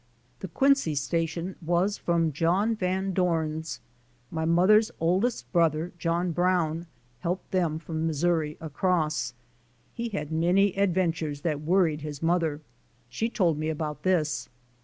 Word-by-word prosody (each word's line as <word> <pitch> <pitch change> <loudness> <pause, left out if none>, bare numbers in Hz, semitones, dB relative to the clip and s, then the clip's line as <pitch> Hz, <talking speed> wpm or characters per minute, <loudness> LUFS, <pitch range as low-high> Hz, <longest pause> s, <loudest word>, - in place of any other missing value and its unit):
^*The 190 - -5
Quincy 270 - +2
Station 165 +4 -2
was 175 +5 +1
from 165 -2 +1
John 180 +9 +1
Van 190 -1 -1
Dorn's. 160 -3 -1 0.5
My 160 0 -2
mother's 195 +7 +5
oldest 185 +9 0
brother, 165 -1 +2
John 170 +1 0
Brown, 175 -1 +1 0.3
helped 175 +8 -3
them 170 -5 +1
from 160 0 -3
Mis 155 -1 -2
souri 160 -4 +1
across. 155 -5 -1 0.6
He 235 0 -3
had 195 -8 -4
many 180 +5 +3
adventures 170 -6 0
that 150 -3 -1
worried 165 -2 +2
his 150 0 -6
mother. 165 -3 +1 0.5
She 220 - -2
told 170 -9 +1
me 155 +1 -1
about 150 -2 -3
this. 155 -10 0
170 Hz, 135 wpm, -27 LUFS, 155-185 Hz, 0.6 s, mother's